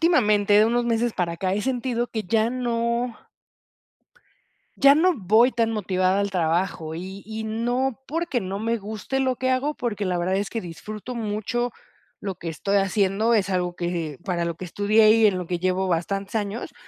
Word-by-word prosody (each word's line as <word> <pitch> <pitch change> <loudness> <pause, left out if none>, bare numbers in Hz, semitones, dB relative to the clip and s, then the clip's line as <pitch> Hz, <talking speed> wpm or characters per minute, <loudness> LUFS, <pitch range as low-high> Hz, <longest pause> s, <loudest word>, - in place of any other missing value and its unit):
últimamente, 210 - +3
de 215 - +6
unos 240 +1 +1
meses 235 0 +1
para 170 -2 -1
acá, 185 +2 -1
he 210 - -1
sentido 245 -2 -1
que 220 -2 -4
ya 220 +4 +2
no 235 -1 -1 1.6
ya 275 +1 +7
no 360 +4 +4
voy 220 +3 +4
tan 230 -2 +1
motivada 190 -2 +1
al 200 0 -1
trabajo, 165 -2 -1
y 190 +3 -7
y 220 +1 -5
no 240 +4 -1
porque 320 -5 -1
no 190 +1 -4
me 230 +2 -1
guste 220 +5 -4
lo 260 -1 +1
que 260 +1 0
hago, 280 +4 0
porque 215 -4 -3
la 180 -1 0
verdad 180 +2 0
es 200 0 -2
que 225 - -3
disfruto 210 +7 -7
mucho 230 +2 -2 0.5
lo 195 -2 -4
que 165 - -6
estoy 195 +5 0
haciendo, 200 +3 +2
es 200 -3 +1
algo 180 -2 -1
que 170 -5 -3
para 175 -3 -1
lo 170 -1 -2
que 185 - -7
estudié 215 +4 +4
y 225 0 +5
en 195 -3 +1
lo 180 - -4
que 175 +1 -3
llevo 185 +1 0
bastantes 195 +3 -2
años. 210 +1 -3
210 Hz, 190 wpm, -24 LUFS, 185-235 Hz, 1.6 s, ya